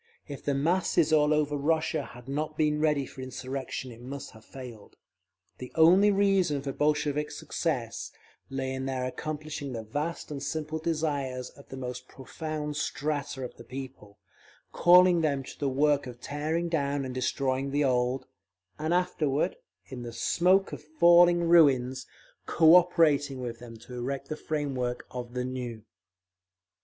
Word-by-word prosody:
If 140 -3 -8
the 140 - 0
masses 170 +2 +2
all 150 -1 +4
over 150 -1 +1
Russia 155 +3 0
had 125 +1 -12
not 150 +2 -3
been 150 -1 +1
ready 150 -3 +2
for 130 - -10
insurrection 130 0 -5
it 115 0 -13
must 135 +2 -7
have 110 - -16
failed. 120 -6 -11 0.6
The 125 - -8
only 180 +6 +6
reason 195 -8 +2
for 140 - -3
Bolshevik 150 0 0
success - - -3 0.4
lay 135 -1 -3
in 130 0 -3
their 130 -1 -2
accomplishing 150 0 -5
the 115 -1 -5
vast 150 +10 -4
and 140 -2 -5
simple 155 +2 -3
desires 145 -6 -2
of 140 - -17
the 135 - -7
most 125 -1 -6
profound 150 +2 -5
strata 145 -3 -2
of 125 - -7
the - - -11
people, 130 -5 -9 0.5
calling 180 0 +6
them 140 -4 0
to - - -11
the 140 - 0
work 145 0 +2
of 120 -1 -9
tearing 155 +6 -2
down 140 -4 -1
and 130 - -5
destroying 130 +1 -1
the 145 +2 +1
old, 125 0 +1 0.5
and 160 +3 0
afterward, 155 -5 0 0.3
in 130 -2 -8
the 120 -1 -7
smoke 185 +10 +2
of - - -6
falling 170 +3 +5
ruins, 135 -7 +4 0.4
cooperating 160 -5 +4
with 120 -2 -5
them 115 -1 -10
to 115 +3 -13
erect 135 +3 -4
the 155 - -2
frame 150 -2 -3
work 125 -1 -3
of 125 -1 -7
the 125 0 -1
new…. 125 -4 -5
140 Hz, 155 wpm, -28 LUFS, 130-155 Hz, 0.6 s, only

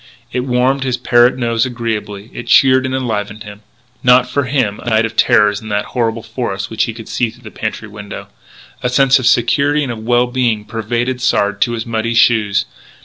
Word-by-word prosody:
It - - -1
warmed 130 +2 +1
his 130 -2 -1
parrot 120 0 +3
nose 115 -2 0
agreeably; 115 -4 -4
it 120 - -8
cheered 130 +1 +4
and 130 - -2
enlivened 105 -4 -3
him. 105 0 -11 0.4
Not 125 0 +5
for 140 +2 -1
him 125 -6 -1
a 120 - -5
night 110 0 +2
of 115 0 -6
terrors 105 -2 +3
in 110 - -9
that 105 0 -1
horrible 115 -2 -1
forest 110 -4 -4
which 110 - 0
he 115 - -5
could 115 -2 -10
see 120 -2 -1
through 120 +3 -17
the 110 - -10
pantry 110 0 -5
window. 105 -1 -9 0.5
A 125 - 0
sense 135 +1 +4
of 125 - 0
security 140 +5 +2
and 130 - -3
of 115 - -6
well 120 +2 +2
being 120 -4 -1
pervaded 120 +3 -3
Sard 105 -5 0
to 120 - +2
his 115 +1 -4
muddy 115 0 -2
shoes. 110 -4 +3
120 Hz, 200 wpm, -16 LUFS, 110-125 Hz, 0.5 s, Not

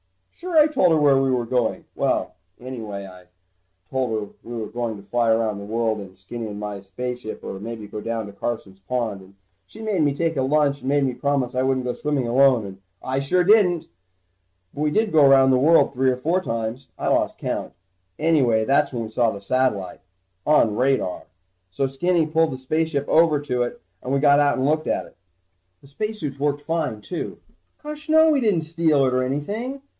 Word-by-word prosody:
Sure, 350 -1 -3
I 305 - +8
told 275 - +3
her 160 - +4
where 140 -3 +4
we 135 - +1
were 125 -2 0
going. 120 -1 -1
Well... - - -1 0.3
anyway 110 -6 -6
I 90 -1 -13 0.7
told 130 -2 0
her 110 -2 -3
we 120 - -9
were 115 - -4
maybe 110 - -6
going 120 -3 -3
to 100 0 -15
fly 120 +2 +1
around 110 -2 +1
the - - -8
world 110 +1 -1
in 95 -1 -11
Skinny 110 +5 -7
and 105 -1 -7
my 105 -1 -5
spaceship, 120 +4 -6
or 95 - -6
maybe 110 0 -7
go 105 +1 -7
down 115 -1 -3
to 100 - -10
Carson's 100 -3 -5
pond. 110 -1 -3
And 95 +1 -18 0.3
she 220 - -11
made 210 -6 0
me 145 -2 +2
take 165 0 -1
a - - +2
lunch 140 +1 +2
and 130 - -4
made 145 0 +2
me 130 -2 0
promise 135 0 -1
I 130 - 0
wouldn't 130 -1 0
go 125 - -1
swimming 145 -5 -2
alone, 125 -2 +4
and 95 -1 -9 0.3
I 130 +1 -1
sure 180 +7 +1
didn't. 185 -4 +4 0.9
But 145 - -6
we 150 - +2
did 215 +7 +1
go 155 -2 +5
around 135 -1 +6
the 130 - +4
world 160 +3 +4
three 130 0 +2
or 125 - 0
four 165 +8 0
times. 115 -2 -4
I - - -3
lost - - +1
count. - - -4 0.4
Anyway 135 -9 +2
that's 140 +3 +2
when 120 -3 -3
we 110 - -7
saw 115 0 +2
the 100 -2 -6
satellite 100 -4 -1 0.5
on 115 -8 +4
radar. 130 -7 0 0.4
So 115 +9 -1
Skinny 165 +5 +1
pulled 160 +1 +1
the - - -5
spaceship 145 +2 -1
over 160 -2 +4
to 125 -4 -2
it 120 - -3 0.2
and 125 - -5
we 140 - +2
got 145 0 +5
out 145 -1 +3
and 130 - 0
looked 155 +2 +1
at - - -1
it. - - -18 0.7
The - - -15
spacesuits 155 -3 -5
worked 145 0 -1
fine, 155 -9 -2
too. 175 - -5 0.5
Gosh 300 +1 -8
no, 315 0 +6
we 285 -3 +2
didn't 200 -8 +2
steal 160 -3 +2
it 130 - +1
or 130 - +2
anything. 210 - -3
130 Hz, 210 wpm, -23 LUFS, 115-155 Hz, 0.9 s, I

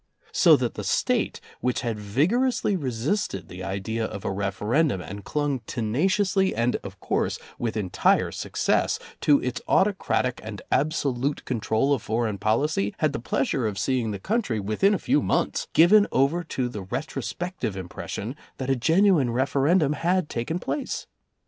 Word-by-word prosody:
So - - +6
that - - -1
the - - -6
State, - - 0 0.2
which 125 -1 0
had 115 -3 -3
vigorously 195 - +1
resisted 125 - -2
the 90 +1 -8
idea 100 +4 -3
of 100 -3 -5
a - - 0
referendum 105 - 0
and 100 +4 -8
clung 145 -3 -1
tenaciously 185 - +1
and, 115 +2 +1
of 95 -1 -10
course, - - -1 0.2
with 115 -2 -2
entire 95 -4 +2
success - - 0 0.2
to 145 -2 +4
its 125 -1 -2
autocratic 190 -10 +1
and 110 -2 -6
absolute 140 -2 0
control 120 +3 +1
of 135 - -1
foreign 110 -2 -1
policy, 110 -1 +1
had 155 -3 +1
the - - -2
pleasure 130 0 0
of 100 -2 -4
seeing 120 +2 0
the 100 - -3
country, 190 - -1
within 110 - +2
a - - 0
few 275 +9 +1
months, - - 0
given 205 +6 +6
over 140 +7 +2
to 130 -4 -2
the 110 -4 -6
retrospective 130 - -4
impression 100 +6 -5 0.2
that 135 0 -2
a - - +3
genuine 165 - +3
referendum 140 +5 +2
had 175 +2 0
taken 120 +8 -2
place. 270 +9 -3
130 Hz, 155 wpm, -25 LUFS, 110-160 Hz, 0.2 s, So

